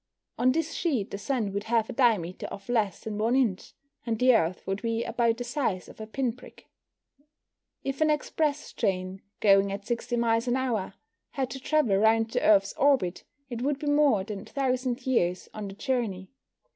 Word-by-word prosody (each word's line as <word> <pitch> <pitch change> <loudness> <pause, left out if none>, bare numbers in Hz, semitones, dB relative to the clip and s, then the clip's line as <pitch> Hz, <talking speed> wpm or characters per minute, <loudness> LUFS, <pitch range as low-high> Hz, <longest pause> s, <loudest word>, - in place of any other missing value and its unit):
On 255 +1 +4
this 320 +3 -1
sheet 260 - -1
the 200 - -5
Sun 225 -5 -1
would 200 +1 -3
have 225 -1 +1
a - - -6
diameter 220 -9 +1
of 200 - -9
less 220 -5 0
than 210 -1 -5
1 230 +4 +2
inch, 230 -9 0 0.3
and 230 -2 -1
the 255 +2 +5
Earth 175 -3 0
would 195 +1 -2
be 230 0 -1
about 235 -1 +1
the 245 - -4
size 240 -7 -2
of - - -12
a 215 - -6
pin 245 +1 -1
prick. 250 - -15 1.2
If 275 +2 -3
an 310 - +4
express 300 0 -1
train, 190 -2 -2 0.2
going 195 -1 +5
at 200 +1 -5
60 240 +1 -2
miles 230 0 +1
an 245 - +2
hour, 225 -7 -2 0.4
had 265 -3 -2
to 270 - -5
travel 265 -8 +2
round 220 +2 +3
the - - 0
Earth's 200 -2 +4
orbit, 265 -11 +2 0.3
it 235 -1 -4
would 280 +2 0
be 295 - -7
more 290 -8 +3
than 205 -1 -6
1,000 255 0 -2
years 180 -9 0
on 210 -2 -5
the 195 - -8
journey. 220 -6 -2
230 Hz, 190 wpm, -27 LUFS, 200-260 Hz, 1.2 s, the